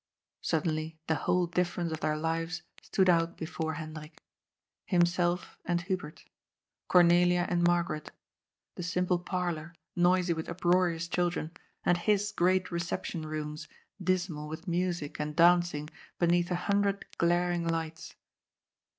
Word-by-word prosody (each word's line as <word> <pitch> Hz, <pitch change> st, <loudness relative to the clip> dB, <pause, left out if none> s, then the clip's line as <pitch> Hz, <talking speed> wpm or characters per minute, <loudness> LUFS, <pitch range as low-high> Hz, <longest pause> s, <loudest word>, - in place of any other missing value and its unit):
Suddenly 160 Hz, 0 st, -1 dB
the 160 Hz, -, +1 dB
whole 180 Hz, +3 st, +1 dB
difference 175 Hz, -1 st, -1 dB
of 160 Hz, -, -3 dB
their 155 Hz, -1 st, 0 dB
lives 165 Hz, +2 st, -2 dB, 0.2 s
stood 190 Hz, -1 st, +1 dB
out 170 Hz, -1 st, +3 dB
before 160 Hz, -1 st, -3 dB
Hendrik. 155 Hz, 0 st, -8 dB, 0.7 s
Himself 175 Hz, -1 st, +1 dB
and 175 Hz, -1 st, 0 dB
Hubert. 180 Hz, -4 st, -4 dB, 0.6 s
Cornelia 175 Hz, 0 st, +5 dB
and 175 Hz, -1 st, +1 dB
Mar 175 Hz, 0 st, +4 dB
garet. 155 Hz, -3 st, -5 dB, 0.6 s
The -, -, -7 dB
simple 180 Hz, 0 st, 0 dB
parlour, 175 Hz, -2 st, -3 dB, 0.2 s
noisy 180 Hz, 0 st, +3 dB
with 160 Hz, -1 st, -5 dB
uproarious 175 Hz, -1 st, +1 dB
children, 175 Hz, -2 st, -1 dB, 0.3 s
and 175 Hz, 0 st, +3 dB
his 210 Hz, +2 st, +1 dB
great 185 Hz, -1 st, +2 dB
reception 170 Hz, -1 st, -3 dB
rooms, 150 Hz, 0 st, -5 dB, 0.4 s
dismal 175 Hz, -5 st, -1 dB
with 160 Hz, +4 st, -8 dB
music 175 Hz, -4 st, -1 dB
and 150 Hz, 0 st, -3 dB
danc 175 Hz, +1 st, +5 dB
ing 150 Hz, +1 st, -4 dB, 0.3 s
beneath 175 Hz, 0 st, +2 dB
a 180 Hz, -, 0 dB
hundred 200 Hz, 0 st, +1 dB
glaring 175 Hz, 0 st, +2 dB
lights. 165 Hz, -1 st, -3 dB
175 Hz, 130 wpm, -30 LUFS, 160-180 Hz, 0.7 s, Cornelia